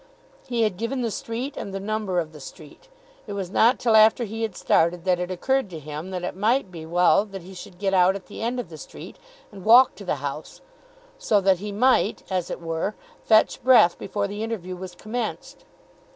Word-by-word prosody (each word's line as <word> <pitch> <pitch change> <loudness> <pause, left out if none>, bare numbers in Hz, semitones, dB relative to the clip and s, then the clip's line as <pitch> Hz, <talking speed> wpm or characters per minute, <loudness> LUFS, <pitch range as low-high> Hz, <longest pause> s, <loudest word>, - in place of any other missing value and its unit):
He 235 -2 0
had 210 -5 0
given 240 +5 -2
the 230 - -1
street 240 +7 -5
and 200 - -6
the - - -3
number 205 -2 -2
of 160 -2 -4
the 150 - -11
street. 155 - -13 0.4
It 205 - -5
was 190 -3 -4
not 235 +5 +4
till 230 -3 +2
after 220 +2 +6
he 225 +1 -5
had 220 -5 -2
started 170 +1 +1
that 180 -1 +2
it 180 0 -3
occurred 265 +5 0
to 170 - -8
him 155 +3 -7
that 180 -1 -5
it 180 - -4
might 215 +2 +1
be 160 -2 -9
well 175 +2 +4
that 195 -3 -9
he 190 +2 -11
should 180 0 -11
get 195 0 -1
out 185 0 +4
at 195 - -8
the 205 - -10
end 240 +2 -2
of 235 - -6
the 160 - -10
street, - - -11 0.3
and 195 -3 -11
walk 245 +5 +7
to 205 - -11
the 180 - -1
house, 145 +2 -6 0.6
so 215 - +2
that 190 -2 +3
he 205 +1 -5
might, 230 0 +2
as 185 -2 -1
it - - -5
were, 165 +5 -3 0.3
fetch 220 -1 +4
his - - -29
breath 230 -8 +5
before 200 +1 -2
the 205 +1 -6
interview 205 -5 -4
was 180 0 -9
commenced. 225 +3 -5
195 Hz, 225 wpm, -24 LUFS, 180-225 Hz, 0.6 s, walk